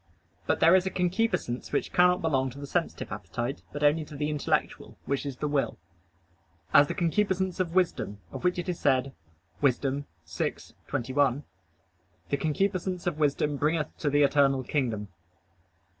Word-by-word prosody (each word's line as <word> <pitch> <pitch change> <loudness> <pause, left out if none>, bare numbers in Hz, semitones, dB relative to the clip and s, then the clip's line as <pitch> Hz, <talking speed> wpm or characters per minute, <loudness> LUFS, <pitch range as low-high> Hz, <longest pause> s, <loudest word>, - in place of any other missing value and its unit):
But - - +1
there 165 +2 +7
is 190 0 +4
a - - +1
concupiscence 180 - -1
which - - -1
cannot 180 0 +4
belong 135 -5 +1
to 130 +3 -11
the 140 - -6
sensitive - - -2
appetite, 120 +5 -4
but 145 +1 -4
only 150 +2 +4
to 150 - -11
the 150 +1 -1
intellectual, 150 -2 -1
which 140 +1 -1
is 135 -3 -5
the 150 - -2
will; 140 -6 0 1.0
as 145 - +7
the - - -3
concupiscence 190 +1 0
of 175 -2 -1
wisdom, 170 - 0
of - - -7
which 180 0 +2
it 175 - -3
is 180 -2 -2
said 135 -1 +2 0.5
(Wis. 135 -4 +4
6:21): 130 - -2 0.9
"The 140 - +1
concupiscence 180 +3 -1
of 170 -4 -1
wisdom 150 0 +1
bringeth 150 +2 0
to 150 - 0
the 145 +1 +4
eternal 135 -1 +3
kingdom." 115 -7 -2
145 Hz, 160 wpm, -28 LUFS, 135-175 Hz, 1.0 s, there